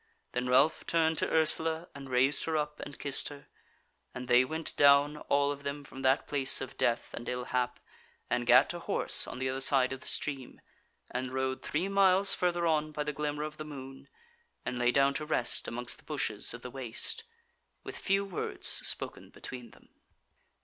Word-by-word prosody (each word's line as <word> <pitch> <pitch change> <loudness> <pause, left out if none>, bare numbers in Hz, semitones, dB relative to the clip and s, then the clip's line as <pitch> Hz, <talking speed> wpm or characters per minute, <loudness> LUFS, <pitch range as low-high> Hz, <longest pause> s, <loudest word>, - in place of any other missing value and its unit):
Then 125 0 -2
Ralph 135 +5 +3
turned 160 -1 +2
to - - 0
Ursula 160 +1 +1
and 140 -1 -10
raised 130 +3 +3
her 160 -1 0
up 150 0 -3
and 145 - -8
kissed 140 -2 0
her, 145 -1 -10 0.7
and 125 0 -6
they 125 +1 +6
went 160 +5 -4
down 145 +1 +5
all 140 -1 +1
of 145 0 -6
them 140 +1 -5
from 135 -1 -10
that 130 +1 +2
place 135 -2 +3
of 130 - -7
death 120 0 0
and 120 - -6
ill 125 0 -3
hap, 125 0 -2 0.5
and 125 -1 -1
gat 125 +1 +7
to 175 - -6
horse - - +1
on - - -7
the 130 +1 -2
other 130 +1 -1
side 130 -1 +4
of 135 - -7
the - - -7
stream, 135 -4 -2 0.5
and 125 +1 -3
rode 130 0 -1
three 165 +6 -1
miles 195 0 +4
further 175 -1 0
on 155 -2 +1
by 150 0 -3
the 150 0 -3
glimmer 150 0 -3
of 155 0 -6
the 155 - -5
moon, 135 -2 -10 0.6
and 125 -1 -3
lay 120 0 +3
down 140 +1 +3
to 150 - -3
rest 150 -6 +1
amongst 120 +1 -5
the - - -18
bushes - - -3
of 120 - -12
the 125 - -7
waste, 130 - -3 0.6
with - - -7
few 195 0 0
words 190 -3 -5
spoken - - 0
between 125 -2 -9
them. - - -21
140 Hz, 195 wpm, -31 LUFS, 130-155 Hz, 0.7 s, gat